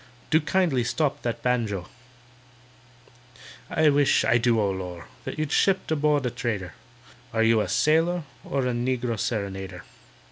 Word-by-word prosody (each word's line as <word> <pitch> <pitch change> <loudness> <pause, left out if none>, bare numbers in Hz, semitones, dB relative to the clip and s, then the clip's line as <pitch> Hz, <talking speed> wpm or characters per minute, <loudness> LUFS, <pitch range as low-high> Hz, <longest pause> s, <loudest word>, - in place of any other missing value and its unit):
Do 160 +1 +5
kindly 150 -5 +1
stop 140 +4 -1
that 120 -1 -3
banjo! 110 -7 0 1.8
"I 155 -1 +3
wish, 145 -1 +3
I 120 - +4
do—O 115 -4 +2
lor'!— 90 -3 -6 0.2
You'd 155 -1 -3
shipped 190 -4 +2
aboard 150 -2 +2
a 125 - 0
trader: 105 -7 -3 0.6
Are 115 0 +1
you 115 -1 +4
a - - -3
sailor 160 - +2 0.2
or 135 -1 -1
A 125 - 0
negro 120 -2 -1
serenader?" 95 -5 -3
120 Hz, 135 wpm, -25 LUFS, 105-150 Hz, 1.8 s, Do